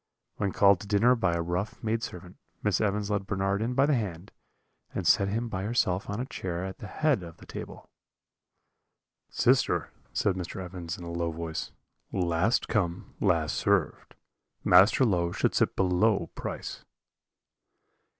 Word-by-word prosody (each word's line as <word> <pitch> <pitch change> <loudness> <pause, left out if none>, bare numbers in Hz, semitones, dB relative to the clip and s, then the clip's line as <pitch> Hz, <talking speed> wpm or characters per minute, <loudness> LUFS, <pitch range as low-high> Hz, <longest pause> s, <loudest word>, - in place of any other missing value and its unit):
"When 100 -2 0
called 100 0 +5
to 105 - -9
dinner 110 +5 +4
by 90 -8 +1
a 85 - -1
rough 90 +5 -3
maidservant, 110 -5 -4 0.3
Miss 105 -4 +1
Evans 105 0 0
led 100 -1 -1
Bernard 100 0 0
in 120 +3 -1
by 135 +1 +5
the 150 - +2
hand, 100 -7 -3 0.6
and - - -2
set 100 - +4
him 115 +4 -1
by 95 -4 -3
herself 100 -3 0
on 105 +2 -3
a 125 - -2
chair 90 -8 -4
at 95 0 -7
the 105 - -7
head 150 +1 +1
of 85 -1 -10
the - - -14
table. - - -8 1.4
"'Sister,' - - +2 0.2
said 100 - +1
Mr. 90 0 -5
Evans, 90 -2 -6
in 90 - -9
a 85 - -6
low 85 0 -1
voice, 80 0 -5 0.4
'last 90 +5 +1
come, 90 -5 -1
last 85 -6 +1
served - - 0 0.5
Master 95 +8 +6
Low 85 -6 +1
should - - 0
sit - - +1
below 95 0 +2
Price.' - - -6
95 Hz, 160 wpm, -28 LUFS, 85-105 Hz, 1.4 s, Master